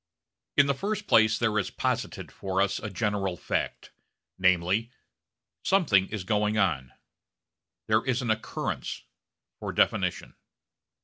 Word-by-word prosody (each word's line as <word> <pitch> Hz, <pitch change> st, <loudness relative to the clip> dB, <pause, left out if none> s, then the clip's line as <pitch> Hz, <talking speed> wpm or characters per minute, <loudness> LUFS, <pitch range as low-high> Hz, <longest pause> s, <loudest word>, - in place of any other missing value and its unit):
In 140 Hz, -, +7 dB
the 140 Hz, -, +2 dB
first 205 Hz, +8 st, -3 dB
place 110 Hz, -, +5 dB
there 110 Hz, -2 st, +1 dB
is 100 Hz, -, -2 dB
posited -, -, -2 dB
for 95 Hz, -1 st, -3 dB
us 100 Hz, 0 st, +1 dB
a 110 Hz, -, -5 dB
general 100 Hz, -2 st, -1 dB
fact: -, -, -3 dB, 0.5 s
namely, 95 Hz, +5 st, +2 dB, 0.7 s
something 130 Hz, -, +3 dB
is 105 Hz, -4 st, -5 dB
going 105 Hz, +2 st, +1 dB
on; 75 Hz, -, +1 dB, 0.9 s
there 110 Hz, +1 st, +2 dB
is 130 Hz, -1 st, 0 dB
an 115 Hz, -, +1 dB
occurrence 110 Hz, 0 st, -3 dB, 0.6 s
for -, -, -4 dB
definition. -, -, +1 dB
105 Hz, 125 wpm, -28 LUFS, 95-115 Hz, 0.9 s, In